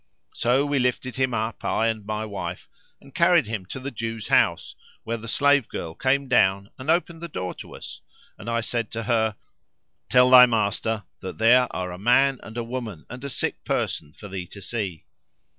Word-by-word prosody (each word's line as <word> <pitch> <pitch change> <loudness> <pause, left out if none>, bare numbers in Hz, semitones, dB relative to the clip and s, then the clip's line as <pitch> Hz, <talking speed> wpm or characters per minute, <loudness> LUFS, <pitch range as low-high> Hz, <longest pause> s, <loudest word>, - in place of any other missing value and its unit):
So 125 +4 +2
we 145 -1 +1
lifted 125 0 -1
him 130 -1 +1
up, 110 0 -3
I 110 - +1
and 110 -2 -2
my 110 +1 -3
wife, 100 -2 -6 0.3
and 140 -1 -18
carried 170 -3 +4
him 105 -4 -5
to 130 - -6
the 135 +2 -5
Jew's 115 -2 -5
house - - +2 0.3
where 115 +1 -3
the 115 0 -9
slave 140 0 +3
girl 80 -1 -5
came 135 +7 +1
down 100 -2 +2
and 130 +4 -6
opened 170 0 +1
the 170 - -4
door 90 - -4
to - - -11
us - - -9 0.3
and 110 - -8
I 115 0 0
said 115 -1 -2
to 115 0 -3
her, 110 -2 +1 0.7
'Tell 125 +3 +5
thy 125 -1 +10
master 110 -1 0 0.2
that 95 -1 -7
there 125 +3 +5
are 90 -1 -4
a 90 - -8
man 130 +5 +3
and 110 +1 -10
a 120 - -1
woman 115 -8 -6
and 125 +2 -8
a 140 - -4
sick - - -2
person 75 -2 -2
for 105 - -11
thee 95 -2 -6
to 100 - -11
see!' 100 -5 -4
115 Hz, 200 wpm, -24 LUFS, 105-130 Hz, 0.7 s, thy